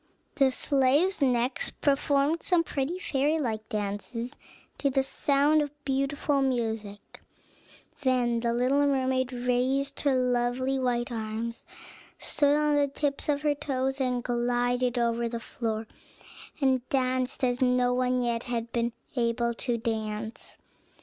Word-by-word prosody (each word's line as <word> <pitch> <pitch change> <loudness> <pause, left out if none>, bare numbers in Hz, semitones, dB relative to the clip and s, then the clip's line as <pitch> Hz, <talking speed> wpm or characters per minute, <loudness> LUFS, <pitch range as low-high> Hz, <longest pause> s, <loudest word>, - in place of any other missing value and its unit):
The 270 -4 +3
slaves 285 +8 +2
next 250 -1 +1
performed 285 +2 +2
some 350 -2 +3
pretty 295 +3 -2
fairy 300 -3 0
like 220 -7 -3
dances, 210 +4 -4 0.4
to 280 - +2
the 270 0 +1
sound 285 +3 +2
of 295 - -2 0.2
beautiful 275 +1 0
music. 220 -6 -3 0.8
Then 250 -3 +2
the 235 0 0
little 260 +4 +2
mermaid 260 -2 +1
raised 255 +3 0
her 280 -2 +2
lovely 250 +1 +1
white 245 -1 0
arms, 225 +1 -4 0.5
stood 290 0 +2
on 300 -1 +2
the 285 -1 +3
tips 280 +1 -2
of 290 0 +1
her 295 -1 +3
toes, 270 -1 -2
and 250 -2 0
glided 245 +1 0
over 235 0 +1
the 235 0 -4
floor, 225 -2 -4 0.7
and 265 -3 +2
danced 255 0 0
as 245 0 +1
no 250 -1 +3
one 250 0 +1
yet 235 -1 -1
had 235 -1 -3
been 235 0 -1 0.2
able 235 -1 +1
to 235 0 -1
dance. 220 -1 -4
255 Hz, 135 wpm, -28 LUFS, 235-275 Hz, 0.8 s, The